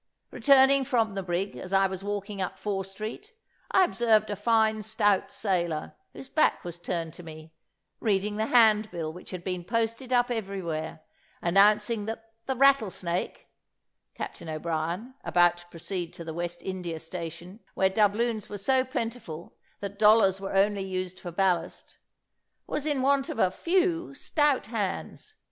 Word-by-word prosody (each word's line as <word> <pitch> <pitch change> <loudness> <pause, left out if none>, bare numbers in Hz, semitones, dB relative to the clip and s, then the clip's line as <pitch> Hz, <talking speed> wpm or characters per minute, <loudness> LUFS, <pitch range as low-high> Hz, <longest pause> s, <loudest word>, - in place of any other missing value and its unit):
Returning 275 -1 +5
from 230 -5 +1
the 195 - -2
brig, 185 +2 -2
as 185 - -7
I 195 0 +5
was 190 0 -3
walking 205 0 -4
up 185 - -3
Fore 195 -2 -2
street, 215 - -7 0.4
I 380 - +5
observed 220 - +2
a - - -1
fine 220 +1 +2
stout 205 -2 +1
sailor, 175 -6 -1 0.2
whose 265 - -10
back 310 - +2
was 175 -1 -7
turned 170 -2 -3
to - - -11
me, 160 -1 -11 0.5
reading 205 -1 0
the 220 +1 0
handbill 215 -9 +3
which 180 - -11
had 180 -2 -6
been 180 -1 -3
posted 230 +6 -2
up 245 0 +3
everywhere, 180 -8 -4 0.4
announcing 210 +4 +3
that 225 0 -6 0.2
the 265 - 0
Rattlesnake, 220 -10 +1 0.7
Captain 165 - -6
O'Brien 165 +8 -3
(about 175 0 +3
to 175 0 -15
proceed 175 0 -5
to 170 - -8
the 160 -1 -6
West 175 +1 -5
India 180 -4 -4
station, 170 +3 -7 0.2
where 190 - +3
doubloons 215 +2 +1
were 205 - -5
so 260 +6 +2
plentiful, 230 - -5 0.3
that 200 0 -6
dollars 210 -3 +5
were 195 0 -4
only 200 0 +3
used 185 -1 -4
for 175 - -7
ballast), 175 -2 -1 0.7
was 300 - -3
in 285 -4 0
want 275 0 +2
of - - -4
a 185 -5 +3
few 340 - 0
stout 295 -1 +1
hands. 225 - -4
200 Hz, 155 wpm, -27 LUFS, 175-230 Hz, 0.7 s, Returning